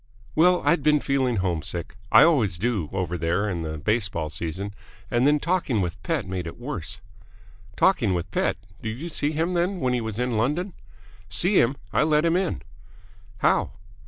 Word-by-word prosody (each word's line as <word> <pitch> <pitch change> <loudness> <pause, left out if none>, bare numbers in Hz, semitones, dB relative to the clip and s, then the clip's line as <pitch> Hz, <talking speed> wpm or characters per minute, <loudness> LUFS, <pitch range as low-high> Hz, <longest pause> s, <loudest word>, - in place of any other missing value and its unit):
"Well, 180 +3 +4
I'd 170 - +3
been 150 +1 +4
feeling 135 -3 +1
homesick 90 -2 -3 0.2
I - - +9
always 120 - +3
do 100 -6 -1
over 90 -2 -2
there 85 +5 0
in 90 -5 -2
the 80 -1 -4
baseball 100 -3 -1
season 90 +6 -4 0.4
and 120 +3 +3
then 150 0 +4
talking 170 - 0
with 90 -3 -3
Pett - - -1
made 90 -2 -4
it 85 - -8
worse 120 - -5 0.4
" 105 - -25 0.3
"Talking 110 - +3
with 90 +2 -4
Pett? - - 0 0.2
Did 110 0 -4
you 170 +3 -5
see 150 -2 -1
him, 165 +3 0
then, 180 +2 0
when 130 -4 +1
he 125 - 0
was 110 -2 -4
in 125 -2 0
London?" 155 - 0 0.6
"See 175 - +3
him? 130 +4 +1 0.2
I - - +3
let 155 +1 +3
him 165 0 +3
in!" 185 -1 -1 0.8
"How?" - - +2
120 Hz, 185 wpm, -25 LUFS, 90-150 Hz, 0.8 s, I